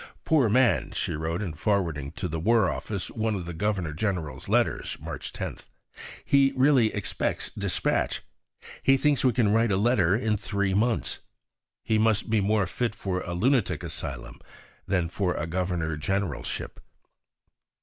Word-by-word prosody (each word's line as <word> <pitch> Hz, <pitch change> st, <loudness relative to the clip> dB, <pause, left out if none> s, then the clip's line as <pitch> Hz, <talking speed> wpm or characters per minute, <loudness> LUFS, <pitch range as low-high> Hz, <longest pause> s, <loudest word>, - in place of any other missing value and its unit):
"Poor 145 Hz, -8 st, +4 dB
man!" 125 Hz, +2 st, +3 dB
she -, -, -1 dB
wrote 80 Hz, +5 st, -2 dB
in 85 Hz, -6 st, -4 dB
forwarding 80 Hz, -6 st, -1 dB
to 90 Hz, -, -3 dB
the 80 Hz, -1 st, -3 dB
War 110 Hz, +2 st, +3 dB
Office 100 Hz, -4 st, -4 dB
one 110 Hz, -1 st, -1 dB
of 90 Hz, -3 st, -4 dB
the 85 Hz, -, -5 dB
Governor 90 Hz, -3 st, -1 dB
General's 80 Hz, -7 st, -3 dB
letters -, -, +1 dB
(March -, -, -6 dB
10); -, -, -5 dB, 0.7 s
"he 140 Hz, -1 st, +4 dB
really 130 Hz, -4 st, +4 dB
expects 105 Hz, -, -2 dB
despatch. -, -, -1 dB, 0.6 s
He 135 Hz, 0 st, +5 dB
thinks 145 Hz, 0 st, +2 dB
we 130 Hz, -, +5 dB
can 110 Hz, -3 st, +2 dB
write 115 Hz, 0 st, +3 dB
a 95 Hz, -, +2 dB
letter 100 Hz, -4 st, +3 dB
in 110 Hz, -2 st, 0 dB
three 100 Hz, -1 st, -1 dB
months! 115 Hz, +4 st, 0 dB, 0.6 s
He 110 Hz, -1 st, +1 dB
must 110 Hz, 0 st, +2 dB
be 110 Hz, -2 st, +3 dB
more 105 Hz, 0 st, +2 dB
fit 115 Hz, +5 st, -2 dB
for 95 Hz, -4 st, -2 dB
a 85 Hz, -, -4 dB
Lunatic 120 Hz, +1 st, +1 dB
Asylum 65 Hz, -3 st, -6 dB, 0.5 s
than 90 Hz, -4 st, +1 dB
for 90 Hz, +1 st, -1 dB
a 80 Hz, -, -2 dB
Governor 85 Hz, -2 st, -1 dB
Generalship." 95 Hz, +1 st, -3 dB
100 Hz, 155 wpm, -27 LUFS, 85-115 Hz, 0.7 s, He